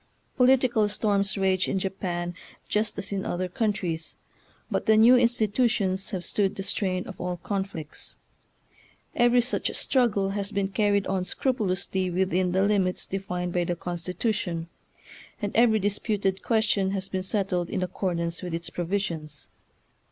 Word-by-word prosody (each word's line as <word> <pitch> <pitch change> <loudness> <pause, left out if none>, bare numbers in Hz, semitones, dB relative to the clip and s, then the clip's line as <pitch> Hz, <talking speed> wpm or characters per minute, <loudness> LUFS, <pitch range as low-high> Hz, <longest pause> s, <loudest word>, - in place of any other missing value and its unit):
Political 250 -4 +4
storms 205 -1 +1
rage 190 -1 +2
in - - 0
Japan 180 -2 -2 0.3
just 210 0 0
as 200 0 -4
in 195 -1 -1
other 185 +1 -2
countries, 180 -5 -1 0.5
but - - -1
the 220 0 +6
new 235 +3 +8
institutions 220 -5 +2
have 185 -4 -3
stood 200 -1 +1
the 195 - -4
strain 185 -2 -1
of 190 - -9
all 180 0 -2
conflicts. 190 -4 -5 1.0
Every 240 0 +5
such 250 +2 -1
struggle 205 -7 +2
has 200 0 -2
been 200 -1 0
carried 200 0 +2
on 190 -1 0
scrupulously 190 -5 -1
within 185 0 +1
the 190 +2 +2
limits 195 -3 +1
defined 180 -2 -3
by 175 - +2
the 175 - -1
Constitution, 175 0 -2 0.7
and 205 -2 -3
every 225 -1 +5
disputed 200 -1 0
question 215 -4 +2
has 190 0 -3
been 190 -1 -2
settled 185 -2 -1
in 185 - -1
accordance 170 -2 -2
with 175 -3 -3
its 170 0 -5
provisions. 170 -5 -3
195 Hz, 145 wpm, -26 LUFS, 180-210 Hz, 1.0 s, new